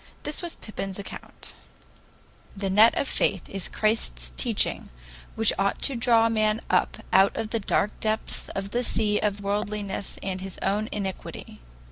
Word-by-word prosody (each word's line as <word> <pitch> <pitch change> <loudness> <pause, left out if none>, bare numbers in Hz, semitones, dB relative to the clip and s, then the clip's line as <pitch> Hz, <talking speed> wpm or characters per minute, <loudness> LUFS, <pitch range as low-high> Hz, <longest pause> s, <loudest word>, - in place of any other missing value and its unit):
This 295 +4 -1
was 345 -2 -4
Pypin's 195 -3 -5
account: 200 - -9 1.0
"'The 195 -1 -1
Net 215 +4 +6
of 280 - +1
Faith' 190 -3 0
is 195 -2 -3
Christ's - - 0
teaching, 65 - +1 0.5
which 225 -1 +3
ought 200 0 +1
to 275 - +2
draw 230 -1 +4
man 215 -1 +2
up - - +2 0.2
out 195 +1 +5
of 220 -1 -3
the 230 - +1
dark 205 0 +1
depths 220 0 -1
of 195 0 -3
the 245 +1 0
sea 210 -3 +1
of 205 -1 -1
worldliness 205 -1 -2
and 190 -1 -3
his 190 -1 -7
own 205 +3 0
iniquity. 195 -3 -5
210 Hz, 155 wpm, -26 LUFS, 195-220 Hz, 1.0 s, Net